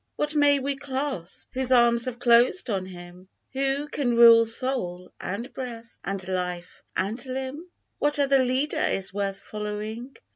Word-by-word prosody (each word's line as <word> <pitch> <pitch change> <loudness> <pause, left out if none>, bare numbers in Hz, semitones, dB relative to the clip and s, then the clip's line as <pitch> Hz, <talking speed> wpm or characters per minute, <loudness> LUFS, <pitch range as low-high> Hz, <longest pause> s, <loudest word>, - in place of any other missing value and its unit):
What 295 0 -1
may 290 -1 +4
we 275 +1 -2
clasp, 270 - -4
whose 260 0 0
arms 235 -1 +5
have 255 -2 -4
closed 240 +4 +3
on 190 -2 -2
him 180 0 -12 0.2
Who 275 +2 -1
can 260 -4 -1
rule 230 -1 +7
soul, 220 -7 +1
and 230 +7 -5
breath, 235 -3 -8
and 195 0 -4
life, 180 -1 -4 0.2
and 215 +6 -2
limb? 265 +6 -5 0.3
What 295 +1 +2
other 275 -2 +3
leader 260 +4 -1
is 190 0 0
worth 200 -1 -3
following 215 +4 -6
240 Hz, 150 wpm, -25 LUFS, 195-270 Hz, 0.3 s, rule